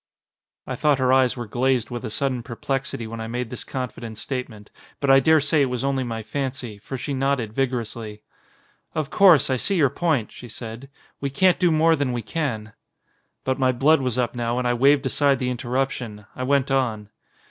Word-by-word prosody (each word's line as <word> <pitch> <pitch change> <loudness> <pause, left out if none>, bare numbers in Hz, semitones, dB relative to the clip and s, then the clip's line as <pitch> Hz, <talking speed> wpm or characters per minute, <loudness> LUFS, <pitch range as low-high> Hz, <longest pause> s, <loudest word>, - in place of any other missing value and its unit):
I - - -4
thought 150 -2 +2
her 130 0 +2
eyes 130 -1 +3
were 120 - -4
glazed 125 +2 0
with 120 0 -5
a 115 - -3
sudden 130 +2 -1
perplexity 125 +1 -3
when 115 0 -6
I 110 - -4
made 120 0 -4
this 125 - -5
confident 120 -4 -6
statement, 115 -4 -5 0.3
but 140 -2 +2
I 135 - +8
daresay 155 +1 +3
it - - +4
was 125 0 -3
only 135 -1 0
my 115 -2 -4
fancy, 130 -4 -4
for 130 +6 -6
she 140 +3 -4
nodded 135 -5 0
vigorously. 115 -4 -3 0.7
"Of 155 -1 -2
course, 175 -8 +6
I 130 - +2
see 200 - 0
your 145 -7 +3
point," 150 -8 0
she 125 - -11
said. 115 +3 -8 0.3
"We 140 - -2
can't 180 +7 +3
do 180 - +4
more 160 +1 +4
than 140 -4 -1
we 120 -1 -3
can." 110 -5 -3 0.7
But 130 +1 -1
my 130 -1 +3
blood 140 +5 +3
was 125 -2 -1
up 125 -2 0
now 120 0 -2
and 125 -1 0
I 120 - +2
waved 135 +3 +4
aside 140 -2 +3
the 125 -1 -1
interruption. 125 -4 -3
I 130 - -3
went 140 0 +2
on. 110 -6 0
130 Hz, 200 wpm, -23 LUFS, 120-140 Hz, 0.7 s, I